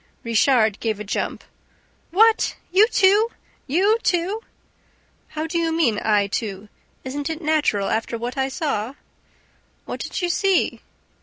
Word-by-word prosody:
Richard 230 -2 +3
gave 220 -3 -2
a - - -4
jump. 200 - -3 0.7
"What, 445 +5 +3 0.2
you 400 +4 +6
too! 415 0 +4 0.4
You 390 - +3
too!" 375 +4 0 0.9
"How 310 0 -4
do 335 +1 -1
you 330 -1 0
mean, 295 -10 +1
I 210 -2 +3
too? 200 0 -4 0.3
Isn't 285 +3 -4
it 320 -1 -4
natural, 300 - +1
after 225 +1 -1
what 240 +2 -5
I 265 -1 0
saw?" 265 -4 -3 0.9
"What - - -6
did - - -4
you 350 - +1
see?" 390 0 +1
295 Hz, 140 wpm, -22 LUFS, 225-355 Hz, 0.9 s, you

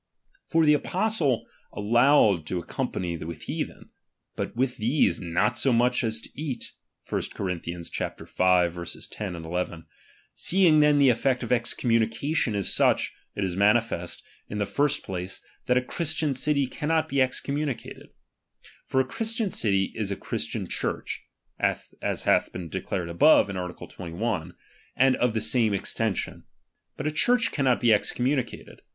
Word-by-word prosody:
For 165 -1 +3
the 150 - +6
apostle 180 - +1 0.3
allowed 110 - +4
to 90 - -2
ac 85 - -5
company 85 -2 -3
with 80 -1 -7
heathen; - - -5 0.4
but - - -4
with 125 +1 0
these, 120 +8 +2
not 95 +7 0
so 135 - +3
much 125 +1 +3
tts 110 -2 -1
to - - -7
eat 145 -4 -5 0.3
(1 - - -1
Cor. 100 - -3
v. 90 -2 -2
10 90 +2 -1
11). 85 0 -4 0.5
Seeing 175 -4 +4
then 150 -1 +5
the 140 -2 +6
effect 125 +1 +1
of 120 - -5
excommunication 120 +2 +1
is 100 -2 +1
such, - - +3 0.2
it 100 - -2
is 90 -2 -2
manifest, 100 -3 +1 0.3
In 105 - -4
tlie 105 -1 -1
"first 145 0 +1
place, 90 0 -5 0.3
that 125 - +3
a 125 - +2
Christian 155 +1 -1
city 140 +1 +1
cannot 160 +4 -1
he 140 - -1
ex^o/n 135 +1 +1
miunicated. 145 -4 -4 0.8
For 130 - +2
a - - -2
Christian 225 - -1
city 100 -3 +1
is 110 -3 -3
a 100 - -1
Christian - - -4
Church, - - -3 0.3
(as - - -2
hath - - +3
been 90 -2 -6
declared 85 +2 -3
above, 100 - +5
in - - -6
art. 90 -1 -5
21), 90 -1 -4 0.4
and 130 0 +4
of 120 -2 +1
the 110 - +1
same 110 -1 +2
extension; 105 +1 -2 0.5
but - - -5
a 155 - +1
Church 235 +9 +2
cannot 130 -4 +2
be 115 -2 +5
excommunicated. 125 +4 -1
120 Hz, 150 wpm, -26 LUFS, 95-140 Hz, 0.8 s, the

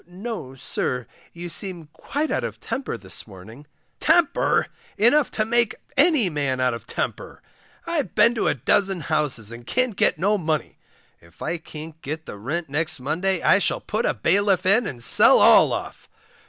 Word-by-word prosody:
No, 180 - -7
sir, 125 -1 -2 0.3
you 175 +1 -8
seem 175 -1 -2
quite 295 +3 -3
out - - -1
of - - -6
temper 265 - -4
this - - -6
morning. 110 +8 -13 0.3
Temper! 325 0 +2 0.3
enough 245 +7 +4
to 215 - -1
make 235 -1 +1 0.2
any 290 - +4
man 140 -5 -2
out 125 -1 +1
of 115 - -8
temper. - - -5 0.4
I've 335 -5 -1
been 235 - +5
to 235 - -1
a - - +1
dozen 195 -3 +1
houses, 150 -9 -1
and 120 +1 -10
can't 255 -4 0
get - - +2
no 200 +5 +1
money. 155 -3 -3 0.4
If 85 0 -14
I 170 - -3
can't 160 0 -11
get 155 +3 -6
the 100 - -9
rent 155 +10 -4
next 155 +2 -1
Monday 170 +7 -1
I 190 - +5
shall - - 0
put 215 +2 -2
a - - 0
bailiff 195 0 +1
in 205 +4 +3
and 120 -3 -6
sell 115 - +6
all - - +6
off. - - -6
170 Hz, 175 wpm, -23 LUFS, 145-215 Hz, 0.4 s, sell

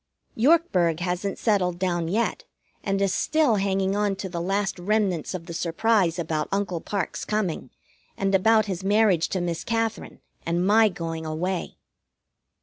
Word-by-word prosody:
Yorkburg 220 - +3
hasn't 180 +2 -2
settled 185 -6 +1
down 175 -2 -1
yet, 220 +7 -1 0.4
and 195 0 0
is 195 -2 +1
still 300 -8 +2
hanging 195 0 0
on 205 -1 +1
to 190 - -5
the 170 -2 -4
last 195 +1 -1
remnants 190 -3 0
of 170 -2 -6
the 170 - -7
surprise 175 +1 +1
about 160 -2 -2
Uncle 195 -4 -1
Parke's 200 -5 -3
coming, 200 -11 -2 0.5
and 195 0 0
about 215 +3 +4
his 190 -3 -4
marriage 200 -4 +3
to 190 - -1
Miss 170 -1 -3
Katherine 225 -1 -2 0.2
and 170 +2 0
my 215 +2 +5
going 165 -3 -5
away. 170 +4 -3
190 Hz, 150 wpm, -25 LUFS, 175-210 Hz, 0.5 s, my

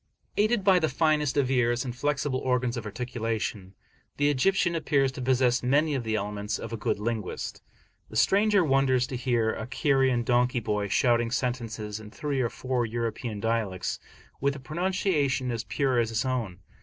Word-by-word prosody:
Aided 215 0 +2
by 190 -2 +5
the 160 - +1
finest 150 0 +1
of 135 -2 +2
ears, 125 -1 +2
and 125 -2 -4
flexible 145 0 -1
organs 125 -1 0
of 115 -3 -5
articulation, 110 -4 -4 0.4
the 145 0 +3
Egyptian 175 +5 +2
appears 140 -5 +1
to 130 - -7
possess 125 -1 +2
many 145 +5 +2
of 130 -3 -1
the 110 -1 -1
elements 105 0 -2
of - - -7
a - - 0
good 105 - -1
linguist. 110 -1 -4 0.5
The - - -11
stranger 200 -1 +4
wonders 135 -3 +3
to 130 - -6
hear 120 -3 +1
a 110 - -5
Cairene 130 -2 +2
donkey 125 +1 +2
boy 105 -2 -1
shouting 120 +2 +2
sentences 115 -4 -3
in 110 -1 -10
three 140 +3 -2
or 120 - +1
four 125 0 -2
European 115 -1 -3
dialects, 110 -4 -1 0.4
with 140 +1 +1
a - - -7
pronunciation 155 -4 0
as 115 -1 -3
pure 125 +4 +1
as 115 -1 +1
his 115 +1 -1
own. 115 -8 -2
125 Hz, 175 wpm, -27 LUFS, 115-140 Hz, 0.5 s, by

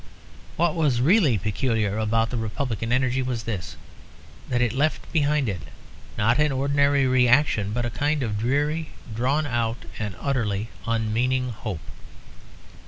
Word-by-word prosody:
What 170 -1 +2
was 150 -7 +1
really 150 - +4
peculiar 110 +1 -1
about 115 +1 +1
the 125 - -2
Republican 115 +1 -3
energy 130 0 +2
was 125 -3 -3
this, 100 -6 -5 0.7
that 125 -2 +1
it 120 -3 +1
left 150 +4 -1
behind 150 -3 +2
it, 95 -4 -3 0.6
not 115 +5 +2
an 150 -1 +3
ordinary 140 +1 +2
reaction 125 -4 +3
but 120 +2 -1
a 120 - -2
kind 145 +3 0
of 105 -3 -2
dreary, 145 +6 0 0.3
drawn 135 +7 +1
out 120 -3 -2
and 105 -4 -3
utterly 115 -5 -1 0.2
unmeaning 115 +3 0
hope. 105 -7 -5
125 Hz, 140 wpm, -24 LUFS, 110-140 Hz, 0.7 s, really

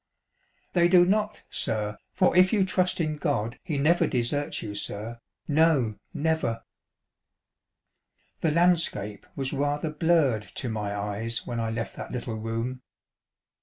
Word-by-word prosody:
They 175 -1 +5
do 175 0 +6
not, 210 +3 0
sir, 105 -1 0 0.2
for 185 -1 +2
if 185 +1 +6
you 205 -4 +3
trust 185 -1 +1
in 155 -2 -1
God 125 -7 -1
he 155 -5 -2
never 155 +5 +3
deserts 135 +3 -1
you, 105 - -5
sir; 105 +3 -5 0.3
no 145 -8 +3
never." 160 -7 -1 1.8
The 165 - +1
landscape 160 - +1
was 135 -1 -2
rather 145 +2 -1
blurred 155 -9 +2
to 125 - -2
my 105 -2 -3
eyes 105 +3 -3
when 120 -1 -3
I 115 -1 -1
left 115 0 -4
that - - -7
little 120 -2 -4
room. 115 +3 -3
140 Hz, 135 wpm, -27 LUFS, 115-165 Hz, 1.8 s, do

